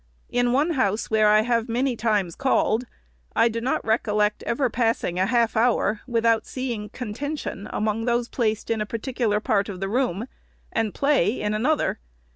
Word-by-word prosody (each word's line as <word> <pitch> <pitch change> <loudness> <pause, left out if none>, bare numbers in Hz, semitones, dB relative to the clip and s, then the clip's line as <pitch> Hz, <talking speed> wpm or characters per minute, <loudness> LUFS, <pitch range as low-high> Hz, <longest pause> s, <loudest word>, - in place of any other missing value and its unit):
In 245 0 +2
one 290 +7 +2
house 225 - 0
where 215 -1 +4
I 215 0 +6
have 235 0 0
many 250 +2 0
times 210 -6 0
called, 255 -2 +1 0.5
I 230 +1 +4
do 230 0 -3
not 255 +3 -1
recollect 210 -2 +1
ever 255 +3 +1
passing 225 -6 0
a 190 - +2
half 235 0 +2
hour, 220 -2 +2
without 230 -2 +2
seeing 235 -5 -4
contention 250 -2 -5
among 215 +1 -1
those 240 -1 +1
placed 220 -3 -1
in 225 -1 0
a 210 - -2
particular 230 -1 -1
part 210 -3 0
of 190 -3 -6
the 195 - -2
room, 230 -2 0 0.5
and 225 -3 -1
play 275 -6 +2
in 210 0 -1
another. 260 +9 +1
230 Hz, 170 wpm, -24 LUFS, 210-245 Hz, 0.5 s, I